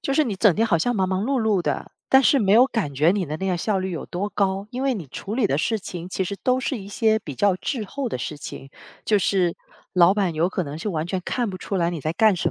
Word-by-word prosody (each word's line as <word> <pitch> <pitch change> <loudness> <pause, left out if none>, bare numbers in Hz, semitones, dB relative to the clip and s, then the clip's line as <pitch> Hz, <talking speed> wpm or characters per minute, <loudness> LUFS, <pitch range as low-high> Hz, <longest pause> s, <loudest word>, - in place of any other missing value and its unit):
就 275 - -1
是 310 - +4
你 215 -6 -2
整 190 -3 +4
天 225 +1 +2
好 170 -7 +2
像 245 +6 0
忙 190 -1 +2
忙 190 +1 0
碌 265 -1 +1
碌 215 -4 +2
的， - - -3 0.2
但 265 0 +6
是 275 - +4
没 200 -3 +2
有 245 +4 +7
感 205 - -2
觉 150 +5 +4
你 190 -3 0
的 155 +2 -4
那 190 - -3
个 180 -2 +1
效 195 +2 0
率 190 0 -3
有 165 - -5
多 195 +4 -3
高， 195 0 0
因 255 +2 -4
为 270 -1 +1
你 180 -9 -6
处 200 - -6
理 240 -5 +2
的 140 - 0
事 220 +6 0
情 180 -2 -7
其 190 0 -2
实 200 - -4
都 255 0 +2
是 260 -1 -2
一 195 0 -9
些 220 +1 +2
比 145 -9 -8
较 200 +3 +3
滞 225 +2 -3
后 265 +5 -4
的 - - -3
事 150 - -5
情， 135 -1 -9 0.3
就 210 -2 +3
是 180 -3 +1 0.4
老 180 +2 +5
板 195 -5 +1
有 165 +3 +2
可 185 - -2
能 145 0 -6
是 210 - -3
完 160 -3 -2
全 185 0 -2
看 240 -4 -1
不 185 - -7
出 195 - -3
来 170 -1 +1
你 170 - -5
在 155 +3 -2
干 215 -1 +4
什 170 -1 -1
195 Hz, 315 characters per minute, -23 LUFS, 175-220 Hz, 0.4 s, 有